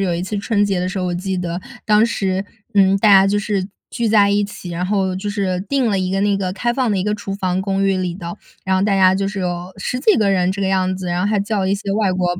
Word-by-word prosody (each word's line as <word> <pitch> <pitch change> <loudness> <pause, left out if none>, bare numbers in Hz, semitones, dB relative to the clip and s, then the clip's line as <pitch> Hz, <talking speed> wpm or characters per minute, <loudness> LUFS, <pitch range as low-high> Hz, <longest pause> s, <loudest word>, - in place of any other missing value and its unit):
有 180 - 0
一 170 - -2
次 205 +3 -4
春 205 0 +1
节 195 -3 0
的 180 - -1
时 185 +1 -4
候， 180 - -1
我 175 - -2
记 185 +1 -3
得 175 0 -3 0.3
当 215 0 +5
时， 195 -4 -1 0.3
嗯， 195 -1 +5
大 210 +2 +3
家 195 -1 +7
就 200 +1 +1
是 200 -2 -2 0.2
聚 235 -2 -1
在 210 -2 +5
一 205 +1 +2
起， 200 -3 -7
然 175 +2 -3
后 190 -1 0
就 205 +2 -4
是 190 -3 -1
定 275 -3 +1
了 200 - +1
一 185 0 -1
个 195 0 0
那 200 -1 +2
个 185 -2 -2
开 240 +5 -1
放 255 -2 0
的 200 - +1
一 185 - -1
个 210 0 0
厨 205 -2 -6
房 185 -1 -1
公 195 0 0
寓 195 -1 +2
里 180 -2 -2
的， 175 0 -7 0.3
然 190 0 +1
后 185 - +1
大 200 -1 +2
家 185 -1 +5
就 195 0 -1
是 200 0 -5
有 180 0 -3
10 250 +6 -3
几 405 +9 +4
个 200 -2 +2
人 180 -1 +2
这 200 +1 -4
个 195 - +1
样 185 -1 +1
子。 185 -1 -6
然 175 0 -1
后 205 +2 0
还 210 - +1
叫 205 0 -1
了 190 0 0
一 - - +3
些 200 -1 -4
外 205 -2 +1
国 180 -1 0
195 Hz, 320 characters per minute, -19 LUFS, 185-205 Hz, 0.3 s, 家